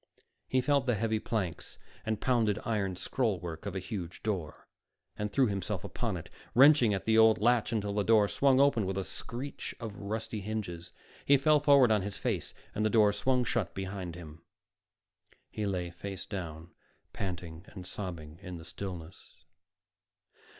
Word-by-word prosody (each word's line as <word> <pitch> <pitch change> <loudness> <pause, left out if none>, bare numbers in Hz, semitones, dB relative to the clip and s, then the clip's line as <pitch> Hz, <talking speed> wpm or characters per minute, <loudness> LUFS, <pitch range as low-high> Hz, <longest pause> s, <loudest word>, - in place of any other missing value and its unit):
He 130 - +2
felt 140 0 +2
the 125 - +3
heavy 110 +1 0
planks 100 -9 -3 0.3
and 110 -2 -1
pounded 115 -5 +2
iron 100 -5 0
scrollwork 90 -5 -2
of 100 - -4
a - - 0
huge 90 -3 -6
door, 90 -8 -3 0.5
and 105 0 -3
threw 135 +3 +4
himself 100 -5 -2
upon - - -3
it, - - -10 0.2
wrenching 135 -3 +7
at 95 -2 -2
the 110 0 +4
old 110 0 +7
latch 120 +1 +3
until 105 -3 -1
the 105 - +1
door 110 -1 +5
swung 135 +4 +3
open 130 -8 +4
with 95 0 -2
a 95 - 0
screech 130 +8 -5
of 110 -4 -6
rusty 110 +1 -4
hinges. 95 -5 -5 0.3
He 140 - +6
fell 150 +3 +4
forward 140 -5 +6
on 105 -2 +3
his 100 +1 -4
face, - - -2 0.2
and 105 - -1
the 110 - +3
door 105 -2 +5
swung 125 +5 +1
shut 105 -8 -1
behind 95 -3 -4
him. 80 -2 -10 1.1
He 105 -1 -2
lay 90 -3 -2
face 95 +2 -6
down, 85 -4 -6 0.4
panting 85 -2 -5
and 95 -3 -10
sobbing 85 -5 -6
in 90 -2 -7
the 80 - -10
stillness. 90 -1 -8
105 Hz, 165 wpm, -31 LUFS, 90-115 Hz, 1.1 s, wrenching